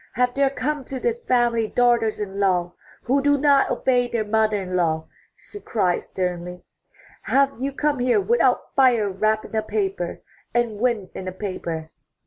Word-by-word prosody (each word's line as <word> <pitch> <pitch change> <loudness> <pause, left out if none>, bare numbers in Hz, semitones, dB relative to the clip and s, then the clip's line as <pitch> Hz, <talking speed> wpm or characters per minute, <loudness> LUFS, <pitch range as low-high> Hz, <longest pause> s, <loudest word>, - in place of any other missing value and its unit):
Have 250 +3 +1
there 275 0 +2
come 280 +1 -3
to 265 +1 -5
this 475 - -1
family 240 - +1
daughters 235 -2 +2
in 200 -1 -5
law 180 -3 +1 0.3
who 275 +3 +2
do 285 +1 +3
not 280 -1 +4
obey 245 -2 +1
their 230 -3 -2
mother 215 0 +2
in 185 -1 -4
law?" 160 -3 0 0.3
she 410 - -11
cried 185 -6 0
sternly. 180 -1 -4 0.7
''Have 275 -2 +2
you 275 +1 -1
come 290 0 -1
here 245 +8 +3
without 470 +4 +1
fire 245 -6 +4
wrapped 215 +3 0
in - - -8
a 220 - +2
paper, 390 - -3 0.3
and 235 -3 0
wind 225 -6 0
in 185 - -7
a - - -2
paper?' 175 -5 -5
230 Hz, 170 wpm, -23 LUFS, 190-270 Hz, 0.7 s, not